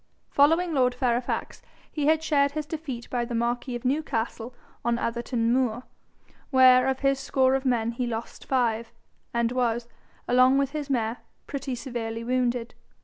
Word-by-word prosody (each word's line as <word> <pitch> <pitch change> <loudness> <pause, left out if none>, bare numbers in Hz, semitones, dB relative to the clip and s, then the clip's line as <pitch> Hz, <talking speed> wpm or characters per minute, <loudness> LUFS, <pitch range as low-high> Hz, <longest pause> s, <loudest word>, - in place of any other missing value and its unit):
Following 325 +4 +3
lord 250 -3 +2
Fairfax, 245 -1 -1 0.3
he 295 -2 -1
had 315 0 +3
shared 285 -3 +2
his 305 0 -3
defeat 290 -6 -6
by 245 -1 0
the 235 0 -4
marquis 240 +2 -1
of 240 - -7
Newcastle 245 -4 -2 0.3
on 235 0 +1
Atherton 235 0 -1
moor, 250 -2 0 0.7
where 255 -1 +6
of 265 0 -1
his 275 -1 +2
score 265 -1 +2
of 270 0 0
men 235 -3 +1
he 245 +1 -3
lost 230 -1 -6
five, 235 -3 0 0.4
and 235 0 0
was, 240 -2 0 0.4
along 255 +2 +5
with 275 -1 +1
his 295 -1 -4
mare, 235 -3 0 0.3
pretty 275 -2 -4
severely 230 -3 -5
wounded. 245 -1 -1
250 Hz, 155 wpm, -26 LUFS, 235-275 Hz, 0.7 s, where